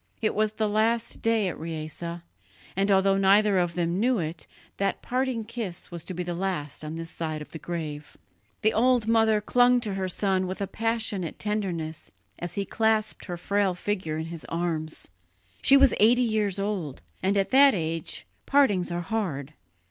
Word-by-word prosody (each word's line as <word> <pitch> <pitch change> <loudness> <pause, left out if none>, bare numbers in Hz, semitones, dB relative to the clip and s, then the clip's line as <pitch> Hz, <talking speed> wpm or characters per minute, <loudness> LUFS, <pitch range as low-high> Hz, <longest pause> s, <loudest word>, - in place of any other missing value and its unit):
It 220 - 0
was 215 0 +1
the 215 0 0
last 225 +2 0
day 225 -3 +2
at 180 - -4
Riese, 155 -1 -6 0.7
and 195 +2 +1
although 195 0 +4
neither 200 0 +5
of 175 -2 0
them 175 +1 0
knew 245 +3 +3
it, 160 -2 -4 0.3
that 195 - -1
parting 255 -3 -1
kiss 215 -7 -5
was 170 -2 -5
to 185 - -5
be 180 - -2
the 175 0 -3
last 170 -5 -3
on 155 +1 -5
this 165 0 -4
side 155 -2 -3
of 150 - -10
the 160 - -7
grave. 155 -4 -6 0.5
The 220 - +4
old 245 0 +3
mother 225 -1 +4
clung 245 +3 +4
to 210 -4 -3
her 190 -1 -2
son 190 0 +1
with 185 - -5
a 200 - 0
passionate 220 -4 -2
tenderness 180 -7 -3 0.3
as 175 0 -5
he 200 - -1
clasped 220 +1 0
her 175 -2 -5
frail 200 +1 +1
figure 180 -5 -2
in 160 - -3
his 165 - -6
arms. 160 - -2 0.5
She 275 - +6
was 275 -1 +6
eighty 240 +4 +5
years 215 -4 0
old, 195 -9 -3 0.2
and 195 +2 +1
at 195 - +1
that 275 -1 +7
age 165 -2 -3 0.2
partings 220 -11 +3
are 175 0 -2
hard. 160 -8 -3
195 Hz, 180 wpm, -27 LUFS, 170-220 Hz, 0.7 s, that